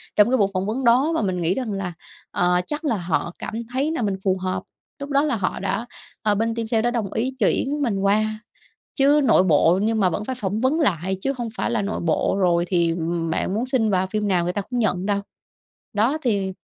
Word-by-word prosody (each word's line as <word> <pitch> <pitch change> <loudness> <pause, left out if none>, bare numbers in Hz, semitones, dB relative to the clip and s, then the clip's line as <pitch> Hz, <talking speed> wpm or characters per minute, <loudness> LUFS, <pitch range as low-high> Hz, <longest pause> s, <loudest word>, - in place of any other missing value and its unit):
trong 210 +2 +5
cái 260 - +3
buổi 200 -3 +3
phỏng 185 +1 -1
vấn 230 +6 -2
đó. 255 +7 +4
Và - - +1
mình 185 -4 -1
nghĩ 170 +3 +2
rằng 250 -2 -3
là, 190 -3 -3 0.4
ờ, 180 0 +2
chắc 300 +2 -4
là 230 -7 +1
họ 175 0 -2
cảm - - -6 0.2
thấy 280 +4 0
là 320 - -2
mình 200 -3 0
phù 190 -1 +2
hợp, 185 0 -3 0.4
lúc 280 +1 -6
đó 280 +1 +3
là 290 -5 +1
họ 195 -4 -2
đã, 200 +4 -2 0.4
ờ, 210 -2 +2
bên 225 +2 0
team 230 -1 -3
sale 225 -1 +1
đã 240 +1 +1
đồng 220 -5 -2
ý 255 +4 -1
chuyển 275 +7 +1
mình 215 -8 0
qua, 215 +2 +1 0.6
chứ 285 +2 +4
nội 220 -6 +5
bộ 170 +2 +4
nhưng 220 0 +1
mà 185 -2 +3
vẫn 205 +5 -3
phải 260 +1 -3
phỏng 205 0 -2
vấn 280 +6 +2
lại 190 - 0
chứ 275 - 0
hông 235 -2 -3
phải - - -1
là 235 -3 +1
nội 200 +1 -3
bộ 170 +3 +1
rồi 175 -2 +2
thì 170 -3 +2 0.4
bạn 185 - -1
muốn 225 +4 -1
xin 255 -4 +1
vào 190 -1 +1
phim 210 +2 -2
nào 180 -3 +2
người 180 +1 -1
ta 205 - -1
cũng 245 +4 -4
nhận 185 -4 0
đâu. 200 -1 0 0.7
Đó 230 +9 +1
thì 200 -6 0
210 Hz, 240 wpm, -23 LUFS, 185-245 Hz, 0.7 s, trong